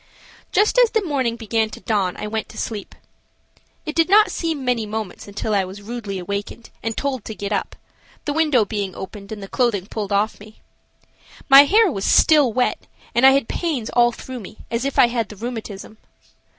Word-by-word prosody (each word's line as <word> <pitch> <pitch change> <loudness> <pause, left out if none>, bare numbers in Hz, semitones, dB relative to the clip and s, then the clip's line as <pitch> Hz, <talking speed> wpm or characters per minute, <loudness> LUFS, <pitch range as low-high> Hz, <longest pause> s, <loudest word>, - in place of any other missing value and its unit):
Just 425 +4 +3
as - - +6
the 445 -2 0
morning 260 -7 0
began 225 -1 -1
to 215 - -10
dawn 200 -6 -1
I - - -5
went 220 +1 -3
to 220 - -12
sleep. 210 -3 -5 0.9
It 305 - -4
did 330 +1 +3
not 420 +2 +6
seem 320 -5 -3
many 240 -3 0
moments 215 -2 -5
until 205 +1 -3
I 200 -1 +3
was 190 +2 -9
rudely 215 -3 -5
awakened 200 +5 -5
and 225 -1 -3
told 265 -5 -2
to 220 - -6
get 200 -1 -5
up, - - -2 0.5
the 290 - -1
window 300 -8 +3
being 200 -3 -4
opened 200 +1 -9
and 210 -2 -6
the - - -7
clothing 215 -5 0
pulled 210 -1 -5
off 205 +2 0
me. 215 +1 -15 0.9
My 275 +1 +10
hair 420 +3 +4
was 195 -7 -4
still 295 -6 +5
wet 250 +2 -1 0.3
and 245 +3 +6
I - - +8
had 275 -4 +1
pains 290 -10 -2
all 240 0 +4
through 255 +1 -8
me, 210 0 -11
as 235 +2 -1
if 275 - -3
I - - +8
had 235 -2 -2
the 210 - -9
rheumatism. 220 -2 -7
230 Hz, 200 wpm, -21 LUFS, 205-270 Hz, 0.9 s, My